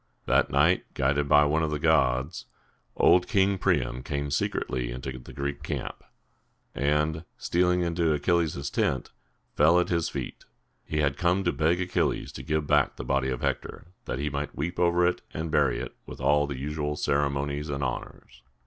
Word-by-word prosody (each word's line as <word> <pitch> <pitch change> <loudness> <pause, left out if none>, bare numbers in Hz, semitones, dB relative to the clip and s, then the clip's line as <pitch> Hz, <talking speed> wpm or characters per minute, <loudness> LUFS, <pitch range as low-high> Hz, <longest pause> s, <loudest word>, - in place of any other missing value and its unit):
That - - +3
night, 80 +7 +3
guided 70 +2 +1
by 75 0 +6
one 75 +2 +1
of 80 - 0
the 75 - -1
gods, 70 -1 +1 0.5
old 90 0 +5
King 100 -3 +2
Priam 65 - 0
came 70 +2 -3
secretly 65 -3 -1
into 65 +1 -6
the 65 - -12
Greek 70 +1 -4
camp, 75 - -5 0.7
and, 75 +3 0
stealing 90 +1 +1
into 85 -1 +1
Achilles' 75 -2 0
tent, 65 - -1 0.4
fell 80 +4 +5
at 90 - 0
his 85 -2 0
feet. - - -6 0.4
He 75 0 -1
had 70 -1 0
come 90 +4 +1
to 85 - +2
beg 80 +4 +1
Achilles 90 0 -1
to - - -8
give 75 -1 -1
back 75 -2 +2
the - - -7
body 70 0 +1
of 65 -2 -3
Hector, - - -3 0.2
that - - -3
he 70 +2 -2
might 70 +1 -4
weep 85 +6 -3
over 85 0 +3
it, 90 - 0
and 80 0 -3
bury - - +2
it - - -7
with - - -9
all 75 +2 +3
the 70 -2 -5
usual 75 +2 -3
ceremonies 70 0 -1
and 70 0 -2
honors. 65 0 -6
75 Hz, 175 wpm, -27 LUFS, 70-85 Hz, 0.7 s, by